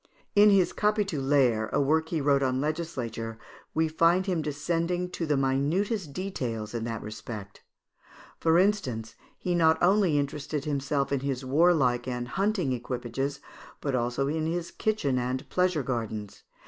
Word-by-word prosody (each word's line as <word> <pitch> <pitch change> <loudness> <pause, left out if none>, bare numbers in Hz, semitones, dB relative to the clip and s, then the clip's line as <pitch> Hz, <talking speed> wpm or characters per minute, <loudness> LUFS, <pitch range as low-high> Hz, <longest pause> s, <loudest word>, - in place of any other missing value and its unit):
In 210 +1 +7
his 195 -3 +4
"Capitulaires," 145 - +2
a - - +1
work 160 +3 +2
he 160 -3 -1
wrote 140 -1 +3
on 130 -1 +1
legislature, 130 -8 -3 0.4
we 160 0 +3
find 170 +4 +3
him 180 -4 0
descending 170 +4 -1
to 165 - -3
the 150 -2 +2
minutest 150 - 0
details 125 - -4
in 115 -1 -3
that 115 -1 -4
respect. 105 -2 -8 0.8
For 165 0 +3
instance, 130 - +1 0.2
he 180 - -2
not 160 -2 +4
only 185 -4 +3
interested 145 0 -2
himself 140 -1 -1
in 140 - +1
his 135 -1 -3
warlike 135 -4 +3
and 125 -1 -3
hunting 190 - 0
equipages, 125 +3 -3 0.4
but 140 - -2
also 125 +2 0
in 155 +2 -1
his 170 +1 -3
kitchen 150 -13 0
and 125 +1 -3
pleasure 180 -5 +1
gardens. 110 -5 -4
145 Hz, 150 wpm, -28 LUFS, 125-170 Hz, 0.8 s, In